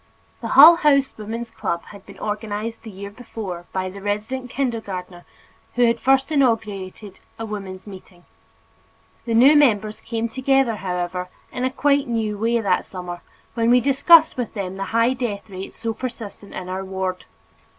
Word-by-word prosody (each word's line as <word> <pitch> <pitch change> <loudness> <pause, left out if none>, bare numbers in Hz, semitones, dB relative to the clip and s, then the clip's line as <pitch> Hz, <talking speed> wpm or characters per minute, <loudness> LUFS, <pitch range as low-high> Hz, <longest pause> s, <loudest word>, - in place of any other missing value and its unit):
The - - -2
Hull 325 +5 +11
House 280 -4 +3
Woman's 225 +2 -6
Club 170 0 -3
had 200 -2 -14
been 200 - -12
organized 215 +1 -4
the 225 - -10
year 200 0 -8
before 205 -6 -7
by 185 0 -2
the 195 +2 -8
resident 215 +6 -3
kindergartner 200 -9 -4 0.5
who 245 0 +4
had 230 0 +2
first 270 +4 +2
inaugurated 210 -7 -1 0.2
a 225 - -5
mother's 195 -3 -7
meeting. 185 -3 -13 1.0
The 230 -2 -1
new 265 +6 +7
members 215 -7 +3
came 230 0 -2
together, 260 -1 +1
however, 180 -1 -3 0.2
in 255 0 -1
quite 285 -1 +2
a - - -5
new 220 -2 -1
way 230 +2 +1
that 190 -4 +1
summer 180 -2 -7 0.3
when 230 -1 +1
we 250 +1 +6
discussed 295 +5 +5
with 245 -2 -4
them 190 -2 -4
the 195 - -3
high 230 +4 +2
death 230 -6 -4
rate 190 -1 -7
so 225 0 -4
persistent 225 -4 -7
in 180 - -6
our 185 +1 -4
ward. 190 -1 -4
220 Hz, 165 wpm, -22 LUFS, 190-245 Hz, 1.0 s, Hull